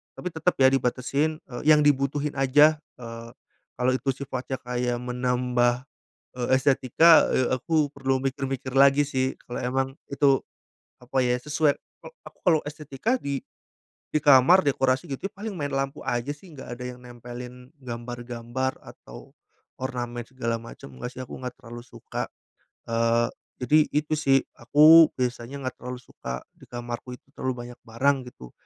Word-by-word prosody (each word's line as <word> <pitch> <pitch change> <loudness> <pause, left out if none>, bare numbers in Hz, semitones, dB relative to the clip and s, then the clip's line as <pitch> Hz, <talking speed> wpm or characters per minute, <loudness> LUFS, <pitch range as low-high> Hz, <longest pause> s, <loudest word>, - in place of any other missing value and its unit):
tapi 180 - -5
tetep 165 +3 0
ya 130 - +7
dibatasin, 135 +4 0
eee, 120 -2 -8
yang 150 -1 +7
dibutuhin 145 0 +1
aja, 150 +3 +5 0.2
eee, 115 0 -8 0.5
kalo 125 +1 +1
itu 130 +1 -1
sifatnya 130 0 -4
kayak 125 0 -1
menambah, 125 0 0 0.5
eee, 125 -1 -2
estetika, 135 +5 +5
eee, 130 - +2
aku 150 +4 +1
perlu 135 -1 0
mikir-mikir 135 -1 -3
lagi 140 +1 +5
sih, 130 -2 -1
kalau 120 - -4
emang 130 +2 0 0.2
itu 140 -1 +3 0.6
apa 125 +2 -5
ya, 125 - +2
sesuai 150 +1 +2
eee, - - -17
aku - - -13
kalau 160 -3 +5
estetika 150 - -2
di 140 - -3 0.7
di - - +3
kamar 145 +6 +7
dekorasi 130 -2 +1
gitu 140 +9 -4
paling 210 0 -6
main 145 -2 -3
lampu 135 +1 -2
aja 120 0 -2
sih 175 +5 -17
enggak 135 -4 -8
ada 125 - -8
yang 125 - -11
nempelin 125 +1 -10
gambar-gambar 120 +1 -4
atau - - -13 0.5
ornamen 120 -2 -4
segala 115 -3 -2
macem. 115 -11 -11
Enggak 65 - -6
sih 130 - -6
aku - - -9
enggak 125 -1 -5
terlalu 120 -2 -10
suka. - - -6 0.6
Eee, 115 0 +2 0.4
jadi 150 +4 +5 0.2
itu 150 +1 0
sih, 135 -3 +3 0.2
aku 155 +6 +8
biasanya 125 +2 -3
enggak 130 - -4
terlalu 125 +1 -6
suka 65 0 -7
di - - -18
kamarku 120 +1 -6
itu - - -35
terlalu 130 -1 -2
banyak 120 0 -12
barang 130 +5 +2
gitu 65 - -13
130 Hz, 155 wpm, -26 LUFS, 120-140 Hz, 0.7 s, aku